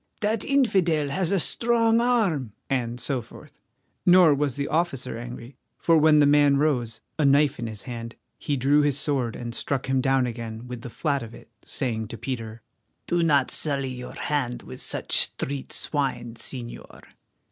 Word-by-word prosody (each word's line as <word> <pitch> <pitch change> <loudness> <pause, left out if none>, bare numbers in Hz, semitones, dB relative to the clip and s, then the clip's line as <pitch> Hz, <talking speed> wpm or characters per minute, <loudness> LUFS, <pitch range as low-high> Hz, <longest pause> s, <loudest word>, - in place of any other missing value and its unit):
"That 215 0 0
infidel 185 - +2
has 170 +4 0
a 195 - +3
strong 230 +4 +2
arm," 195 - +1 0.2
and 120 -2 -1
so 130 0 0
forth. 115 - -15 0.4
Nor 180 -3 +7
was 140 -3 0
the 140 0 -2
officer 160 -6 -1
angry, 120 +2 -8 0.2
for 165 - +3
when 155 -1 +5
the 150 - +6
man 145 -1 +5
rose, 125 -7 0 0.2
a - - +3
knife 140 0 +4
in 120 - -3
his 110 -2 -7
hand, 115 -2 -7 0.2
he 145 - -1
drew 140 +4 +4
his 145 -2 +1
sword 135 -5 0
and 120 -1 -6
struck 135 +2 -2
him 130 0 +1
down 135 0 +2
again 115 -1 -6
with 125 -2 -7
the 120 - -7
flat 140 +2 -1
of 115 0 -9
it, - - -15
saying 110 -5 -2
to 115 - -8
Peter: 115 -2 -5 0.4
"Do 175 0 +1
not 145 -5 +3
sully 140 -3 -1
your 125 0 -8
hand 130 -5 -2
with - - -9
such - - -2
street 140 0 -1
swine, 130 -5 -2
Señor." 120 +1 -6
135 Hz, 175 wpm, -25 LUFS, 120-150 Hz, 0.4 s, Nor